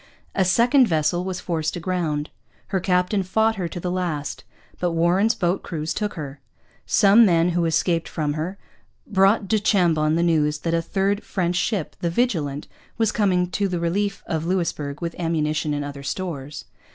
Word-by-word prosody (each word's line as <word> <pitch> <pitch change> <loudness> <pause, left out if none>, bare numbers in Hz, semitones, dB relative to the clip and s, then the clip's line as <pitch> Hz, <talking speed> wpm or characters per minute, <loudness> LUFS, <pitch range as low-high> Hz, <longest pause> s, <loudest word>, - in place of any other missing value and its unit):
A 190 - +2
second 240 +8 +4
vessel 160 +1 +1
was 185 0 -4
forced 160 -3 -2
aground. 165 -4 -2 0.4
Her 190 -1 0
captain 180 +2 +1
fought 220 +4 +1
her 180 -3 -2
to 170 - -6
the 180 +1 -3
last; 170 -6 -3 0.4
but 175 -1 0
Warren's 180 +7 +3
boat 175 +2 0
crews 155 -1 -4
took 210 -1 -3
her. 145 -4 -7 0.5
Some 210 +2 +6
men 170 -4 +4
who 175 -1 +1
escaped 165 +1 +1
from 150 -2 -2
her 165 +6 -4 0.5
brought 195 +1 +3
du 215 +3 +2
Chambon 165 -7 +2
the 170 - +2
news 155 -3 +2
that 165 - -1
a 165 - +2
third 195 +4 0
French 180 -2 -1
ship, 190 -2 -1
the 170 - -1
Vigilant, 165 - -1 0.3
was 225 -2 +2
coming 185 -5 +2
to 200 +1 0
the 180 -2 -2
relief 195 +4 -1
of 160 -1 -2
Louisbourg 165 -5 -2
with 170 -1 -3
ammunition 155 -2 0
and 145 -1 -2
other 140 -1 -7
stores. 145 -3 -5
175 Hz, 175 wpm, -23 LUFS, 155-195 Hz, 0.5 s, Some